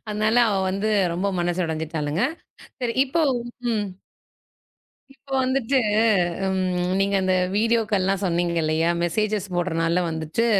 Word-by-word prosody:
அதனால 215 +2 +1
அவ 205 - 0 0.2
வந்து 200 +3 -1 0.2
ரொம்ப 180 +4 -1
மனசு 175 +1 0
உடைஞ்சுட்டாளுங்க. 160 +1 -2 0.6
சரி, 240 -2 -1
இப்ப 320 +5 0 0.5
ம். 210 -2 -1 1.3
இப்ப 270 +1 -19
வந்துட்டு 260 0 +1 0.7
ம் 185 -1 0
நீங்க 200 0 +1
அந்த 185 0 +1 0.2
வீடியோக்கள்லாம் 210 -4 +1
சொன்னீங்க 175 -1 0
இல்லையா? 160 +2 +1
மெஸ்ஸேஜஸ் 205 +3 0
போடுறனால 170 0 0
வந்துட்டு, 160 +8 -2
190 Hz, 115 wpm, -23 LUFS, 170-215 Hz, 1.3 s, அதனால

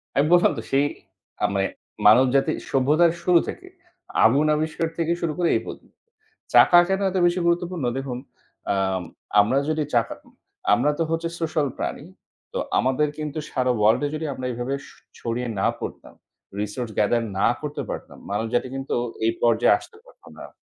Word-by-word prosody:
আমি 140 - +3
বললাম 175 - +5
তো - - -3
সেই 140 +2 +3 0.6
আ - - +5
মানে 95 0 +1 0.4
মানব 110 +5 +7
জাতির 135 - +2
সভ্যতার 150 +6 +3
শুরু 175 -1 +5
থেকে 370 - -7 0.6
আগুন 140 +7 +4
আবিষ্কার 160 +2 -1
থেকে 165 0 0
শুরু 165 -2 -1
করে 175 -2 +2
এই - - +1
পদ্ধতি। - - -11 0.5
চাকা 175 - +8
কেন 195 +1 0
এত 190 - -2
বেশি 175 +1 +2
গুরুত্বপূর্ণ? 170 -4 0
দেখুন 135 -2 -4 0.6
আম 95 -2 0 0.4
আমরা 115 +7 +1
যদি 155 -1 0
চাকা 115 -1 +1 0.6
আমরা 130 +7 +3
তো 165 - +3
হচ্ছে 165 0 -1
সোশ্যাল 155 -3 0
প্রাণী। - - -4 0.5
তো - - -2 0.2
আমাদের 130 +4 +1
কিন্তু 150 0 -4
সারা 130 -1 +1
ওয়ার্লড 110 +4 +3
এ - - +1
যদি 160 - -4
আমরা 130 -1 -6
এভাবে 120 +3 -3
স - - -14 0.3
ছড়িয়ে 120 +1 -3
না - - +2
পড়তাম - - -8 0.5
রিসোর্স 105 +3 -3
গেদার 115 +3 +2 0.2
না 100 - +4
করতে 150 -1 -4
পারতাম - - -7
মানুষ 105 +3 -1
জাতি 120 +1 +1
কিন্তু 135 0 -3 0.3
এই 115 - +2
পর্যায়ে 115 -1 +4
আসতে 435 - -15
পারতাম - - -18
না। - - -11
140 Hz, 170 wpm, -23 LUFS, 120-165 Hz, 0.6 s, চাকা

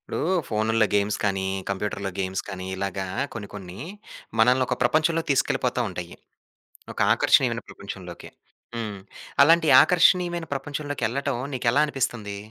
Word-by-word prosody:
ఇప్పుడు - - -5 0.3
ఫోనుల్లో 110 0 +2
గేమ్స్ 105 +1 +1
కానీ, 95 -1 0 0.2
కంప్యూటర్‌లో 100 0 -3
గేమ్స్ 95 0 -2
కాని 95 -2 -6
ఇలాగా 95 0 -3 0.3
కొన్ని 105 -4 -6
కొన్ని 95 -2 -9 0.6
మనల్ని 125 +3 +4
ఒక - - -1
ప్రపంచంలోకి 160 +5 +1
తీసుకెళ్ళిపోతా 135 -2 0
ఉంటాయి. 90 -2 -7 0.8
ఒక - - -9
ఆకర్షణీయమైన - - +3
ప్రపంచంలోకి, - - -9 0.5
హ్మ్. 110 -4 -4 0.4
అలాంటి 165 +2 +5 0.2
ఆకర్షణీయమైన 175 0 +3
ప్రపంచంలోకెళ్ళటం 140 -2 -3 0.2
నీకెలా 125 +3 +2
అనిపిస్తుంది? 120 -7 -3
115 Hz, 115 wpm, -25 LUFS, 100-140 Hz, 0.8 s, అలాంటి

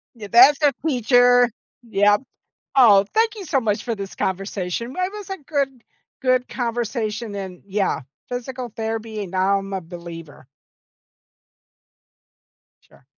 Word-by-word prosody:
Yeah, 215 -3 -9
that's 275 +5 +7
a 290 -2 +5
teacher. 245 -2 +4 0.4
Yep. 205 +1 +3 0.5
Oh, 210 -7 +7
thank 450 0 +2
you 405 -3 -8
so 275 -5 +1
much 210 -3 -1
for 235 -2 -2
this 195 -1 -7
conversation. 195 +4 -3
It 365 +2 -1
was 410 -2 -8
a 385 - -4
good 275 -4 -2 0.4
good 255 -1 +2
conversation 230 -3 -3
and 190 -3 -7
yeah, 200 -3 0 0.3
physical 250 -1 -5
therapy, 220 -1 -4
and 190 -2 -8
now 190 +1 +2
I'm 195 0 -7
a 190 - -2
believer. 165 -4 -10 2.4
Sure. - - -24
225 Hz, 130 wpm, -22 LUFS, 195-255 Hz, 2.4 s, that's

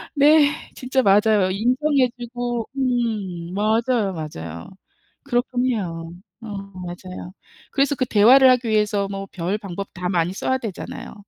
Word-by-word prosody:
네. 290 +1 +6 0.3
진짜 260 +1 0
맞아요. 205 -2 +4
인정해 255 +5 +2
주고 240 -1 -4
음 215 -9 -2
맞아요, 220 0 +1
맞아요. 85 - -7 0.5
그렇긴 245 -1 0
해요. 170 -8 -3 0.3
어 225 - -9
맞아요. 185 -3 -8 0.4
그래서 280 +1 +1
그 255 - 0
대화를 250 +5 +6
하기 250 -2 +1
위해서 210 -2 +1
뭐 195 0 -5
별 185 +4 -2
방법 195 -1 -6
다 180 -1 -3
많이 175 -1 0
써야 260 +6 -1
되잖아요. 220 -8 -7
215 Hz, 275 characters per minute, -22 LUFS, 185-250 Hz, 0.5 s, 네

